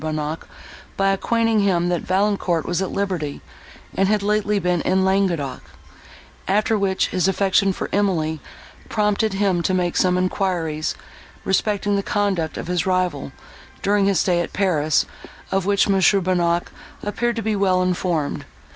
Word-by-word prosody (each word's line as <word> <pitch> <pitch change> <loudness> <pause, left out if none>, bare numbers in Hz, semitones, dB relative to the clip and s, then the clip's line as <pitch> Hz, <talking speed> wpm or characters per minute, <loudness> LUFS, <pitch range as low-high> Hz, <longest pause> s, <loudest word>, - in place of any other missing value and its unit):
Bonnac 155 0 -3 0.5
by 195 0 +2
acquainting 225 +2 +1
him, 180 -4 +2
that 175 -2 0
Valancourt 190 -3 0
was 175 +1 -1
at 190 - -1
liberty, 180 -8 -3 0.6
and 195 - +2
had 210 0 +1
lately 210 0 +1
been 180 -3 0
in 190 0 +1
Languedoc; 185 -8 0 0.9
after 210 +3 +2
which 195 -2 0
his 185 -1 +1
affection 195 0 +2
for - - -4
Emily 165 -6 0 0.5
prompted 210 0 +1
him 195 -3 +1
to 185 +2 0
make 175 -1 0
some 180 -1 +2
enquiries, 180 -4 -1 0.5
respecting 205 +1 +1
the - - +1
conduct 195 -6 -1
of - - -5
his 180 +1 -1
rival, 180 -7 0 0.5
during 200 0 +2
his 195 -4 +2
stay 175 -2 +2
at - - -5
Paris, 155 -7 +1 0.5
of 195 0 0
which 200 -1 +3
M. 200 - +3 0.3
Bonnac 175 -1 0 0.3
appeared 235 +3 -1
to 225 - -3
be 215 0 0
well 185 -2 +2
informed. 175 -4 -1
190 Hz, 150 wpm, -21 LUFS, 175-200 Hz, 0.9 s, which